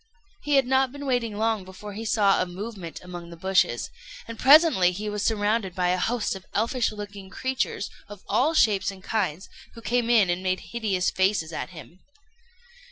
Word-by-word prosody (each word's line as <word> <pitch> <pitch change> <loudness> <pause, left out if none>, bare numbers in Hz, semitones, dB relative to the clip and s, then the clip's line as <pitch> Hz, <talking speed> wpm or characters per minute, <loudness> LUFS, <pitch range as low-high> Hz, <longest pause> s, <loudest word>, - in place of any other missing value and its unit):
He 295 -1 +1
had 270 -2 +4
not 265 0 +2
been 285 +1 -8
waiting 240 -5 -1
long 220 -2 0
before 190 +3 -10
he 220 +3 -6
saw 205 -3 +3
a 185 - -1
movement 190 -2 -7
among 175 -1 -8
the 170 - -11
bushes; 185 -9 +1 0.4
and 230 -1 -8
presently 280 - +6
he 210 +3 -4
was 210 0 -3
surrounded 210 -3 0
by 180 -1 +1
a 180 +1 +1
host 230 0 -1
of 190 -1 -11
elfish 230 +3 +1
looking 205 -2 -8
creatures, 260 -1 -2 0.2
of 205 -2 -11
all 305 +6 +2
shapes 200 -9 +3
and 190 -1 -9
kinds, 190 -6 -2 0.3
who 230 - -10
came 240 -1 0
and 190 -7 +3
made 185 0 -2
hideous 205 -6 0
faces 185 -4 0
at - - -4
him. 175 +1 -13
205 Hz, 180 wpm, -25 LUFS, 185-230 Hz, 0.4 s, presently